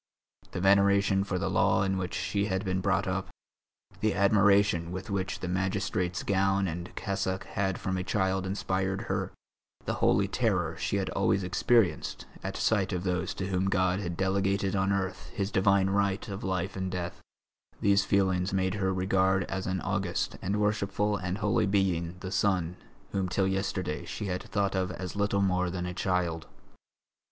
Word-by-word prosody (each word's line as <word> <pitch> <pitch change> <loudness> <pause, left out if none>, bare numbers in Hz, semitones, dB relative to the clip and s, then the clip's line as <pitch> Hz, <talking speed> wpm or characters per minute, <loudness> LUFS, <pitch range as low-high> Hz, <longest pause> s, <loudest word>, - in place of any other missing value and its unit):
The - - -5
veneration 100 0 +4
for 100 -2 -2
the - - -1
law - - +3
in 95 0 0
which 95 0 -3
she 100 0 -1
had 95 +1 -1
been 95 0 0
brought 95 0 +1
up, 95 +1 -1 0.7
the 110 -2 +1
admiration 100 -3 +4
with 95 +2 -6
which 95 -2 -2
the 90 - -3
magistrate's 90 -1 -1
gown 95 0 +2
and 85 +1 -5
cassock 95 -2 -2
had 95 -1 -2
from 95 0 -2
a 90 - -2
child 95 0 0
inspired 95 0 -1
her, 95 -4 -2 0.5
the - - -1
holy - - +4
terror - - 0
she - - -2
had - - -1
always 100 - +1
experienced 95 +3 +1 0.2
at - - -4
sight 100 -3 +1
of 90 0 -2
those 90 -1 -1
to 95 0 -3
whom 95 0 0
God 95 -1 +2
had 85 -4 -4
delegated 95 0 +1
on 95 0 +1
earth 95 -1 -2
His 100 -2 -1
divine 95 0 +3
right 100 0 0
of 100 +3 -5
life 95 -1 -2
and 95 -1 -2
death, 90 -1 -4 0.6
these 100 -1 +4
feelings 95 -1 +1
made 95 -1 +1
her 95 -2 0
regard 95 0 +2
as 95 +1 -4
an 95 -1 -1
august 95 -3 -1
and 100 +3 -1
worshipful 105 0 +1
and 95 -1 -3
holy 105 -1 +1
being 90 -4 +1
the 95 - -5
son 95 -3 +1 0.4
whom 95 -2 -1
till 95 +1 +1
yesterday 95 -4 -2
she - - -5
had 90 -2 -2
thought 100 -1 -1
of 95 -1 0
as 90 +1 -6
little 100 -1 +1
more 90 -1 +1
than 90 0 -3
a 90 - -4
child. 90 -3 -1
95 Hz, 175 wpm, -29 LUFS, 95-100 Hz, 0.7 s, veneration